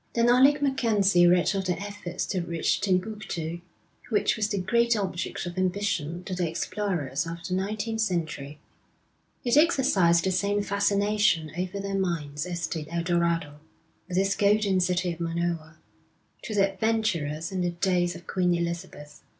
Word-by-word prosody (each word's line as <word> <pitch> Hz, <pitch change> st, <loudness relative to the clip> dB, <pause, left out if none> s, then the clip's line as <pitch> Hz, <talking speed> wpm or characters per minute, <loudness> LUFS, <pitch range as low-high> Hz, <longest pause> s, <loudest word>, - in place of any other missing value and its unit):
Then 235 Hz, 0 st, +3 dB
Alec 275 Hz, +4 st, +5 dB
MacKenzie 210 Hz, -10 st, +3 dB
read 175 Hz, 0 st, +4 dB
of 195 Hz, -1 st, -2 dB
the 180 Hz, -1 st, -1 dB
efforts 200 Hz, -3 st, -5 dB
to 185 Hz, -3 st, -2 dB
reach 170 Hz, -1 st, -1 dB
Timbuktu, 185 Hz, -4 st, -2 dB, 0.5 s
which 215 Hz, -3 st, +2 dB
was 215 Hz, -1 st, 0 dB
the 205 Hz, -, -1 dB
great 235 Hz, +5 st, +2 dB
object 190 Hz, -4 st, -3 dB
of 175 Hz, +1 st, -5 dB
ambition 180 Hz, -3 st, -1 dB
to 185 Hz, -, -5 dB
the 180 Hz, -2 st, -1 dB
explorers 165 Hz, -5 st, -2 dB
of 170 Hz, +1 st, -6 dB
the 185 Hz, -, -3 dB
nineteenth 215 Hz, +4 st, -2 dB
century. 160 Hz, -7 st, -2 dB, 0.9 s
It 245 Hz, +2 st, +2 dB
exercised 200 Hz, -, +4 dB
the 190 Hz, -, +1 dB
same 200 Hz, +2 st, +1 dB
fascination 200 Hz, -5 st, +1 dB
over 185 Hz, +2 st, -3 dB
their 195 Hz, 0 st, -2 dB
minds 155 Hz, -4 st, -2 dB
as 175 Hz, -1 st, -3 dB
did 155 Hz, -3 st, -4 dB
El 170 Hz, 0 st, -2 dB
Dorado, 170 Hz, -4 st, 0 dB, 0.5 s
with 180 Hz, 0 st, -3 dB
its 195 Hz, +1 st, +2 dB
golden 205 Hz, -2 st, +3 dB
city 180 Hz, -1 st, 0 dB
of 165 Hz, -, -12 dB
Monoa, 165 Hz, -1 st, -2 dB, 0.7 s
to 215 Hz, -, -5 dB
the 195 Hz, -1 st, +3 dB
adventurers 190 Hz, -8 st, -1 dB
in 185 Hz, -1 st, -2 dB
the 175 Hz, -, +1 dB
days 175 Hz, 0 st, 0 dB
of 170 Hz, -, -11 dB
Queen 180 Hz, -2 st, +1 dB
Elizabeth. 170 Hz, -3 st, -5 dB
185 Hz, 160 wpm, -27 LUFS, 170-205 Hz, 0.9 s, Alec